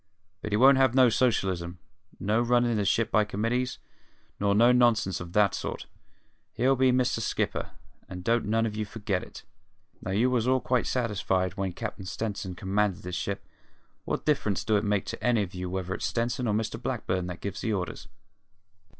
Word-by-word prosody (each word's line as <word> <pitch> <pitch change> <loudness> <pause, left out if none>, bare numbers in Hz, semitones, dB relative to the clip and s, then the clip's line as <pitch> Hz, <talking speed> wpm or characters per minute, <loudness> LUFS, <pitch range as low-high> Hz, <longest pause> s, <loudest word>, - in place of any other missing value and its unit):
But 105 - -5
he 105 - +2
won't 135 +3 +6
have 130 -2 +3
no 130 -2 +6
socialism, 95 -8 0 0.4
no 105 +4 +1
runnin' 120 -1 +2
the 105 - 0
ship 115 +3 +1
by 110 - +4
committees, 115 +5 -1 0.6
nor 100 0 +2
no 120 +3 +6
nonsense 120 -6 +3
of 90 0 -8
that 105 -2 +4
sort; - - -4 0.7
he'll 130 +4 +2
be 130 0 +4
Mister 125 0 +1
Skipper, - - -2 0.4
and 90 -1 -7
don't 115 +4 +1
none 115 +2 +1
of 105 -2 -3
you 110 - -1
forget 100 -3 -3
it! - - -11 0.6
Now, - - -6
you 110 +7 +2
was 120 -2 +1
all 130 0 +3
quite 125 -2 0
satisfied 95 -6 0
when 95 -2 -3
Cap'n 105 -1 -6
Stenson 100 -2 -4
commanded 95 0 -1
the 90 - -6
ship: 90 +3 -3 0.6
what - - -3
difference 110 -10 +1
do 110 - +1
it 105 - +2
make 105 -2 0
to - - -6
any 120 -4 +3
of 95 -1 -8
you 90 0 -4
whether 95 0 -3
it's - - -2
Stenson 120 +1 -1
or 105 - +1
Mr 110 +2 -2
Blackburn 95 -8 -2
what 90 -1 -6
gives 100 -3 -5
the 110 - -1
orders? 90 -4 -4
105 Hz, 190 wpm, -28 LUFS, 95-120 Hz, 0.7 s, won't